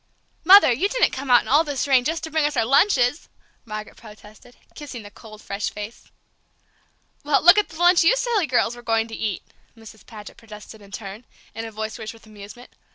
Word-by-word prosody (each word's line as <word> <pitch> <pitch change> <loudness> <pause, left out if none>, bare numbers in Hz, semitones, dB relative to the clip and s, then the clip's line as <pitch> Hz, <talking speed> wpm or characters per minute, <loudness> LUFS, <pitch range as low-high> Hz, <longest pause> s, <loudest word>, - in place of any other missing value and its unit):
"Mother, 375 -4 +7
you 360 - -1
didn't - - +1
come 265 +1 -7
out 245 -1 +5
in - - -14
all 295 +4 +3
this 285 -3 -3
rain 260 -3 +3
just 325 +4 -3
to 320 - -7
bring 315 0 0
us 295 -2 -1
our 225 - +1
lunches!" 275 - +1 0.4
Margaret 215 -1 -8
protested, 215 +2 -16 0.2
kissing 275 -6 -9
the 205 - -13
cold, 215 -1 -15
fresh 200 +1 -4
face. 210 +3 -10 1.1
"Well, 290 -1 +1
look 350 +5 +7
at 415 - -2
the 320 - -13
lunch 350 0 +4
you 370 +9 +4
silly 470 -8 -1
girls 245 -2 0
were 240 - -12
going 225 -1 -1
to 225 - -7
eat!" 210 -4 -4 0.3
Mrs. 220 -1 -15
Paget 210 -2 -12
protested 215 -1 -13
in 200 - -16
turn, 200 +2 -9 0.3
in 225 +1 -7
a 225 - -8
voice 220 +1 -6
rich 220 -1 -7
with 225 -1 -19
amusement. 215 +3 -14
240 Hz, 210 wpm, -22 LUFS, 215-300 Hz, 1.1 s, Mother